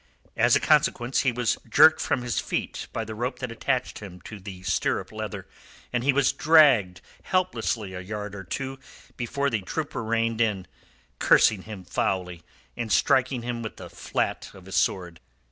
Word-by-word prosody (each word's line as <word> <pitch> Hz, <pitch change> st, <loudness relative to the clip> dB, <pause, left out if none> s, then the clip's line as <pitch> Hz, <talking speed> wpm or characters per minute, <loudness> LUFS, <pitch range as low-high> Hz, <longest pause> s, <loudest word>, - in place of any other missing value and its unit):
As -, -, +4 dB
a -, -, +4 dB
consequence 120 Hz, +2 st, +2 dB
he 130 Hz, -, +2 dB
was 120 Hz, -1 st, 0 dB
jerked -, -, +6 dB
from 125 Hz, -, 0 dB
his 120 Hz, -2 st, -1 dB
feet -, -, -3 dB
by 115 Hz, -, -3 dB
the 110 Hz, -, -6 dB
rope 125 Hz, +3 st, -3 dB
that 125 Hz, -2 st, -5 dB
attached 125 Hz, +2 st, -2 dB
him 95 Hz, -4 st, -10 dB
to 105 Hz, +2 st, -9 dB
the 95 Hz, -1 st, -9 dB
stirrup 90 Hz, -1 st, -1 dB
leather, -, -, -6 dB, 0.5 s
and 120 Hz, -1 st, 0 dB
he 140 Hz, -, +4 dB
was 140 Hz, 0 st, +2 dB
dragged 140 Hz, -, +5 dB, 0.2 s
helplessly 115 Hz, -, -1 dB
a 90 Hz, -, -5 dB
yard 105 Hz, +1 st, -6 dB
or 95 Hz, -1 st, -7 dB
two 135 Hz, +8 st, -5 dB, 0.4 s
before 140 Hz, +3 st, -1 dB
the 110 Hz, -3 st, 0 dB
trooper 145 Hz, +6 st, -4 dB
reined 115 Hz, 0 st, 0 dB
in, 105 Hz, -5 st, 0 dB, 0.5 s
cursing 105 Hz, -4 st, +5 dB
him 105 Hz, -4 st, -8 dB
foully, 90 Hz, -2 st, -2 dB, 0.3 s
and 115 Hz, -2 st, -4 dB
striking 130 Hz, -2 st, +2 dB
him 120 Hz, -1 st, -3 dB
with 110 Hz, -, -7 dB
the 90 Hz, -2 st, -10 dB
flat 85 Hz, -, -2 dB
of 95 Hz, -, -14 dB
his 95 Hz, -, -6 dB
sword. 85 Hz, -3 st, 0 dB
115 Hz, 175 wpm, -26 LUFS, 95-125 Hz, 0.5 s, jerked